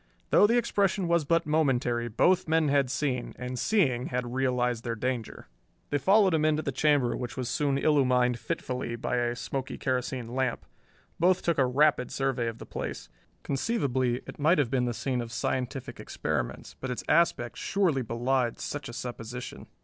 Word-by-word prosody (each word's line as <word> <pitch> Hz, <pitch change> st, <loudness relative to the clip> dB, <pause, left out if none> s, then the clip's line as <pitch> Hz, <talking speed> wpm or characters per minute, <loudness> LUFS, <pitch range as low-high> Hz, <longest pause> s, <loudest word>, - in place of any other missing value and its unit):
Though 205 Hz, -, +6 dB
the 235 Hz, +3 st, +3 dB
expression 200 Hz, -5 st, +1 dB
was 170 Hz, -2 st, +2 dB
but 165 Hz, +3 st, +2 dB
momentary, 130 Hz, -6 st, +1 dB
both 175 Hz, +12 st, +2 dB
men 160 Hz, -1 st, +2 dB
had 140 Hz, -2 st, +2 dB
seen, 130 Hz, -2 st, -2 dB
and 125 Hz, 0 st, -5 dB
seeing 135 Hz, -, +2 dB
had 125 Hz, -1 st, -3 dB
realized 125 Hz, -3 st, 0 dB
their 115 Hz, -1 st, -2 dB
danger. 120 Hz, -1 st, -3 dB, 0.5 s
They 145 Hz, -, +1 dB
followed 195 Hz, +3 st, +4 dB
him 155 Hz, -1 st, +2 dB
into 155 Hz, 0 st, +2 dB
the 140 Hz, -, -1 dB
chamber, 145 Hz, -3 st, +2 dB
which 125 Hz, +1 st, -5 dB
was 125 Hz, -2 st, -2 dB
soon 140 Hz, -1 st, +1 dB
illumined 125 Hz, -5 st, +3 dB
fitfully 125 Hz, -7 st, -3 dB
by 120 Hz, +1 st, -2 dB
a 120 Hz, 0 st, 0 dB
smoky 130 Hz, +1 st, -4 dB
kerosene 125 Hz, -2 st, -2 dB
lamp. 130 Hz, -2 st, -1 dB, 0.5 s
Both 180 Hz, +2 st, +3 dB
took 170 Hz, -4 st, +1 dB
a 130 Hz, -, +4 dB
rapid 140 Hz, 0 st, +3 dB
survey 135 Hz, -3 st, -1 dB
of 115 Hz, 0 st, -4 dB
the -, -, -9 dB
place. -, -, -6 dB, 0.3 s
Conceivably 130 Hz, -, 0 dB
it -, -, -10 dB
might 155 Hz, +5 st, +4 dB
have 135 Hz, -5 st, +1 dB
been 125 Hz, -2 st, +1 dB
the 120 Hz, -2 st, -2 dB
scene 125 Hz, -1 st, -1 dB
of 115 Hz, -1 st, -7 dB
scientific 125 Hz, +2 st, -3 dB
experiments, -, -, -4 dB
but 130 Hz, -, -5 dB
its 125 Hz, -, -4 dB
aspect 155 Hz, -8 st, +2 dB
surely 180 Hz, -9 st, +1 dB
belied 120 Hz, +1 st, 0 dB
such 145 Hz, -2 st, -5 dB
a -, -, -8 dB
supposition. 125 Hz, 0 st, -7 dB
130 Hz, 175 wpm, -28 LUFS, 125-150 Hz, 0.5 s, Though